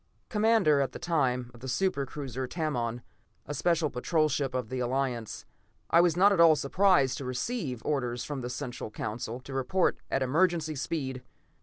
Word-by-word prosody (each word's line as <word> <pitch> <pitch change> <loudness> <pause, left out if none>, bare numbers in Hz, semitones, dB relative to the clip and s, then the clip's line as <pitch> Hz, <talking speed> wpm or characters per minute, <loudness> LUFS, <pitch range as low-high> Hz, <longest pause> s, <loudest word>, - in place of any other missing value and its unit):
Commander 210 - +3
at 135 - -1
that - - -8
time 130 -8 0
of 120 - -14
the 130 - -8
super 140 0 0
cruiser 130 -2 -5
Tamon, 125 -7 -2 0.4
a 145 - -5
Special 165 0 +1
Patrol 155 +5 +1
ship 135 -3 -1
of 125 -4 -2
the 130 - -3
Alliance, 125 -2 -2 0.5
I 170 - +7
was 175 -1 +2
not 200 +3 +6
at 190 - 0
all 165 -2 +8
surprised 150 -1 +3
to - - -5
receive 130 - -3
orders 125 -5 -1
from 145 -3 -4
the 125 - -4
Central 125 -3 -5
Council 110 +3 -5
to 135 - -9
report 135 +8 +1
at 135 - +1
emergency 160 +3 +1
speed. 135 -3 -3
140 Hz, 175 wpm, -29 LUFS, 125-165 Hz, 0.5 s, all